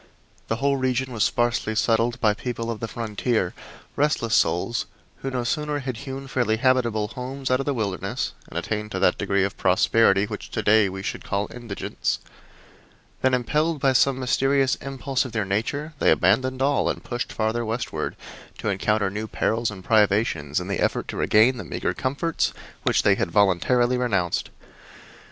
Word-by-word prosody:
The 110 - 0
whole 140 +4 +1
region 130 0 -1
was 110 -3 +1
sparsely 120 -2 +1
settled 115 +2 +2
by 110 -3 +3
people 115 +1 -4
of 110 - -5
the 115 - -3
frontier 110 -3 -1 0.4
restless 140 -6 +1
souls 115 +7 +1 0.3
who 135 - -4
no 125 -2 -2
sooner 150 +4 -1
had 130 -4 -4
hewn 135 +1 -6
fairly 120 -4 +1
habitable 115 -4 +2
homes 130 +2 -5
out 130 - +3
of 135 - -3
the 145 - +2
wilderness 100 +2 -2
and - - -7
attained 105 -1 -3
to 95 - -1
that 90 - +3
degree 100 -1 +1
of 100 - -2
prosperity 100 +2 +4
which 105 -1 -7
to 110 - -3
day 105 -1 +5
we 95 0 -6
should - - -4
call 100 +1 -1
indigence 120 -5 -3 1.0
than 130 0 +3
impelled 150 +5 0
by 135 0 +3
some 130 +1 +3
mysterious 135 +1 +2
impulse 135 0 -2
of 130 - -8
their 110 -3 0
nature 140 +11 -2
they - - +4
abandoned 130 - +2
all 140 +1 +2
and - - -3
pushed 120 -1 -4
farther 110 +2 -1
westward, 115 +2 -3 0.4
to - - -2
encounter 100 0 +1
new 105 +2 -4
perils 115 +1 0
and 95 -3 -9
privations 100 -9 +2
in 90 - -6
the 100 - -2
effort - - 0
to - - -4
regain 120 +4 +4
the 115 - -5
meagre - - -2
comforts 145 +5 -1 0.3
which - - +2
they 100 - +5
had 95 -2 -1
voluntarily 105 +7 +3
renounced. 100 -8 0
115 Hz, 175 wpm, -24 LUFS, 105-130 Hz, 1.0 s, day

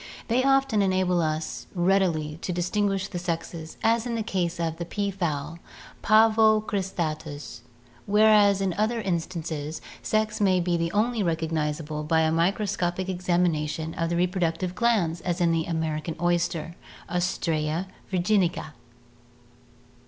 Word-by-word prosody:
They 245 +3 +2
often 270 -5 +3
enable 185 -2 +2
us 155 0 -3
readily 175 -4 +1
to - - -3
distinguish 195 +2 0
the 175 - -5
sexes, 165 -2 -5
as 230 +1 +2
in 235 - -2
the 225 - -1
case 180 -6 -2
of 165 -1 -2
the 170 - -3
pea 200 +3 -2
fowl 165 -4 -3 0.4
(Pavo 220 0 +5
crisUUus) 160 - -4 0.5
whereas 205 -1 +5
in 190 -2 0
other 225 +2 +1
instances 165 -5 -3 0.2
sexes 215 -1 0
may 190 -2 +4
be 170 -1 0
only 225 +3 +1
recognizable 160 -3 -2
by 160 +1 +2
a 160 0 +2
microscopic 180 +1 0
examination 170 -3 0
of 165 -1 -2
the 170 - 0
reproductive 180 0 0
glands, 185 -7 +1
as 175 +2 -2
in 170 -1 +3
the 165 -1 0
American 160 -1 -2
oyster 170 -1 0 0.3
(Ostrea 170 -2 -1 0.3
virginica). 180 -3 +1
175 Hz, 130 wpm, -26 LUFS, 160-200 Hz, 0.5 s, Pavo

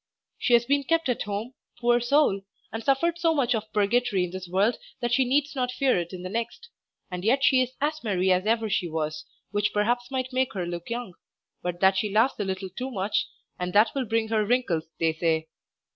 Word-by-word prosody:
She 245 - +1
has 235 0 +5
been 280 +2 +2
kept 330 0 +1
at 245 - 0
home, 210 +5 -4 0.3
poor 240 0 +3
soul, 240 -5 +3 0.3
and 225 0 -4
suffered 335 +7 +1
so 330 -1 +2
much 255 -4 +2
of 220 -1 -3
purgatory 210 -2 +2
in 180 - -4
this 185 0 -6
world 195 +6 +1 0.2
that 240 -1 -1
she 265 - +4
needs 280 +3 +1
not 250 -2 0
fear 255 -5 +2
it 170 0 -5
in 180 -1 -7
the - - -4
next; 235 - -4 0.4
and 180 0 -4
yet 260 +6 +2
she 270 -2 +5
is 255 0 -2
as 305 0 -1
merry 190 -4 +1
as 185 +2 +2
ever 225 0 +2
she 195 -3 0
was, 155 -1 -3 0.3
which 205 +1 +1
perhaps 240 +4 0
might 260 -1 -3
make 260 0 +1
her 185 -4 -2
look 175 +2 -6
young, 235 -5 -4 0.5
but 175 0 -4
that 190 0 +5
she 210 +2 0
laughs 225 +5 +2
a - - +1
little 190 -1 -4
too 250 +8 -5
much, 200 -4 -1 0.3
and 180 0 -3
that 215 +2 +5
will 270 -2 -1
bring 225 0 0
wrinkles, 215 -7 +1
they 165 -1 +2
say. 160 -1 0
225 Hz, 220 wpm, -26 LUFS, 190-255 Hz, 0.5 s, has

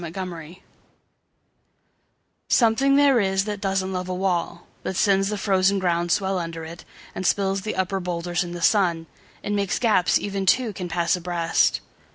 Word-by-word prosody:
Mending 180 +3 -5
Wall 165 0 -10 1.9
SOMETHING 265 +4 +3
there 280 -3 +5
is 195 -1 +1
that 205 -2 -5
doesn't 190 -1 -1
love 185 0 -4
a 185 - -2
wall, 180 -2 -2 0.2
That 190 - -4
sends 195 +1 +2
the 210 - -2
frozen 195 -1 +2
ground 175 -2 0
swell 190 0 +1
under 165 -1 -6
it, 170 +2 -10 0.3
And 185 - -5
spills 195 +1 +1
the 215 +2 -4
upper 190 +1 -1
boulders 175 0 -2
in 175 0 -7
the 175 - -6
sun; 175 -6 +2 0.4
And 205 - -2
makes 200 -2 0
gaps 215 -7 +3
even 195 -1 -4
two 235 +2 +2
can 180 -1 -6
pass 170 0 +1
abreast. 175 -1 0
190 Hz, 170 wpm, -23 LUFS, 175-200 Hz, 1.9 s, there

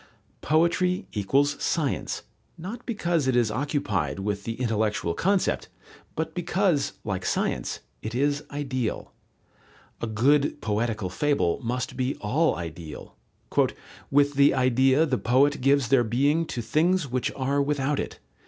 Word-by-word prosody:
Poetry 175 +5 +2
equals 140 +8 +1
science, 155 -7 -1 0.3
not 210 +9 -7
because 170 - 0
it 130 - +2
is 120 -3 +3
occupied 105 - -1
with 100 0 -3
the 115 - -2
intellectual 110 -7 0
concept, 190 - +1 0.5
but 160 0 -3
because, 175 - +1
like 95 -3 -3
science, - - -1 0.2
it 110 +2 -5
is 145 +2 +1
ideal. 130 -5 -3 0.9
A 115 - -1
good 140 +7 +2
poetical 110 -3 -1
fable 140 - +1
must 125 +2 -3
be 130 +1 -1
all 150 +10 +1
ideal: 80 -2 -8 0.9
"With 145 +1 +3
the 140 0 +5
idea 130 +3 +4
the 130 -5 0
poet 135 +5 +3
gives 135 -2 +3
their 130 -2 +5
being 140 +8 +1
to 120 - -4
things 165 +5 +2
which 125 0 -1
are 140 +1 0
without 145 0 0
it. - - -4
135 Hz, 135 wpm, -26 LUFS, 115-150 Hz, 0.9 s, the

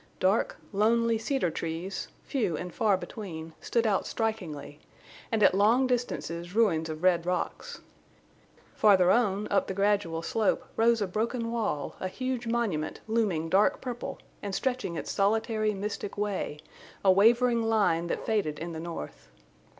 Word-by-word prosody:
Dark, 190 +4 +2 0.2
lonely 230 +2 +3
cedar 225 - 0
trees, 165 +4 -4 0.2
few 220 - -1
and 180 +1 -6
far 205 -3 +2
between, 165 -6 -7
stood 235 -1 0
out 205 -3 +1
strikingly, 180 -10 -3 0.5
and 220 -2 +2
at - - +6
long 220 +7 +4
distances 190 -8 -2
ruins 165 -8 +2
of 155 +2 -6
red 175 -2 +4
rocks. 180 - -3 0.9
Farther 190 -4 +5
on, 210 -3 +2
up 200 - +2
the 190 - -4
gradual 195 -5 +1
slope, 215 +4 0
rose 230 -1 +3
a - - -2
broken 230 +4 -2
wall, 220 -11 -2
a 185 - -2
huge 245 +4 -3
monument, 215 -10 -1
looming 210 -8 0
dark 195 +5 +3
purple 245 -2 -5 0.2
and 200 -2 -4
stretching 255 -9 -1
its - - -4
solitary, 215 +1 +1
mystic 205 0 -4
way, 200 -7 -2 0.5
a 190 - +8
wavering 235 +4 +4
line 205 -7 +2
that - - -3
faded 200 -9 0
in 170 +2 -5
the 160 - -5
north. 165 - -7
205 Hz, 150 wpm, -28 LUFS, 175-230 Hz, 0.9 s, a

